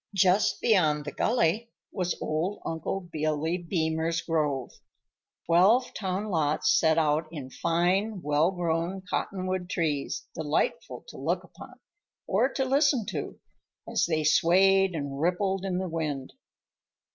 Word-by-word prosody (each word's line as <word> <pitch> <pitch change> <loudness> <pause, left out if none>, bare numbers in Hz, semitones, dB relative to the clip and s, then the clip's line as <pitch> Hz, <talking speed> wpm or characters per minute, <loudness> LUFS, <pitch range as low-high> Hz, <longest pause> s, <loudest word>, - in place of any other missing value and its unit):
Just 190 +2 +3
beyond 155 -9 +2
the 145 - -4
gully 225 - +1 0.2
was 180 -3 -2
old 165 +7 -2
Uncle 165 +4 -3
Billy 160 0 -2
Beemer's 165 -1 -1
grove,—twelve 165 - 0
town 195 +1 -3
lots 155 -3 +1
set 160 -1 +3
out 155 0 +2
in 140 -5 -7
fine, 185 +5 0
well 150 +3 +2
grown 175 +1 -2
cottonwood 185 -2 -2
trees, 165 - -2
delightful - - -2
to - - -11
look - - -1
upon, - - -14 0.5
or 230 +8 +1
to 265 - -1
listen 270 -3 +2
to, - - -5 0.5
as - - +1
they 160 -2 0
swayed 190 +4 +4
and 140 -2 -4
rippled 190 +3 0
in 190 -2 -1
the 185 0 -2
wind. 150 -5 -4
175 Hz, 125 wpm, -27 LUFS, 155-195 Hz, 0.5 s, swayed